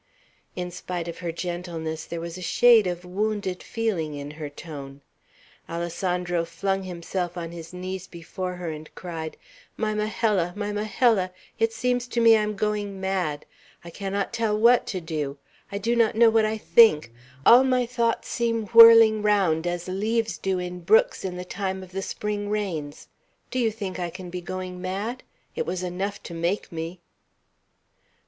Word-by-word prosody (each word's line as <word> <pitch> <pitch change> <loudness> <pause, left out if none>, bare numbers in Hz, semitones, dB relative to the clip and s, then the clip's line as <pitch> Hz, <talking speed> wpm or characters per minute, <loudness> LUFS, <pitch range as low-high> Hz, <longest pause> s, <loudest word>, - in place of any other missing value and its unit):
In 180 -1 -4
spite 175 -1 -5
of 170 - -6
her 170 -1 -3
gentleness, 170 -2 -4
there 170 - -5
was 170 0 -6
a 185 - -8
shade 230 +2 +5
of 175 0 -4
wounded 200 0 -2
feeling 190 -10 -2
in 145 0 -6
her 155 -1 -6
tone. 145 -2 -9 0.7
Alessandro 175 +1 -1
flung 195 +3 -2
himself 180 0 -4
on 165 -1 -5
his 165 -1 -9
knees 185 +1 -6
before 180 +2 -6
her, 175 -2 -4
and 155 0 -8
cried: 165 -3 -6 0.4
"My 215 -1 0
Majella! 210 -4 0
my 205 0 -3
Majella! 210 -1 +2 0.3
it 225 0 +2
seems 245 +1 -1
to 240 - -2
me 230 -1 +7
I 215 - +3
am 210 0 -2
going 205 -1 -2
mad! 185 -6 -2 0.4
I 170 - -9
cannot 200 +3 -3
tell 225 -2 0
what 235 +3 +5
to 190 - -2
do. 150 -4 -3 0.3
I 200 - -2
do 230 +4 0
not 230 -2 +3
know 225 0 +6
what 220 -1 +4
I 215 +1 -1
think; 210 - +5 0.3
all 245 +3 +9
my 255 -2 +2
thoughts 235 -1 -1
seem 230 -2 -1
whirling 230 -2 +9
round 190 -6 +2
as 175 0 -3
leaves 215 -1 -1
do 190 +2 0
in 180 0 -4
brooks 205 +6 +3
in 180 -2 -4
the 180 - -6
time 190 0 -3
of 185 - -13
the 195 +1 -3
spring 205 +1 -3
rains. 175 -9 -3 0.4
Do 255 - -1
you 235 -2 +3
think 205 -4 -5
I 175 -1 -2
can 180 0 -9
be 180 0 -4
going 185 0 -6
mad? 200 +7 -3 0.3
It 475 - -2
was 185 0 -2
enough 190 +3 -3
to 170 - -8
make 170 +4 -2
me!" 165 +2 -6
185 Hz, 175 wpm, -25 LUFS, 170-215 Hz, 0.7 s, all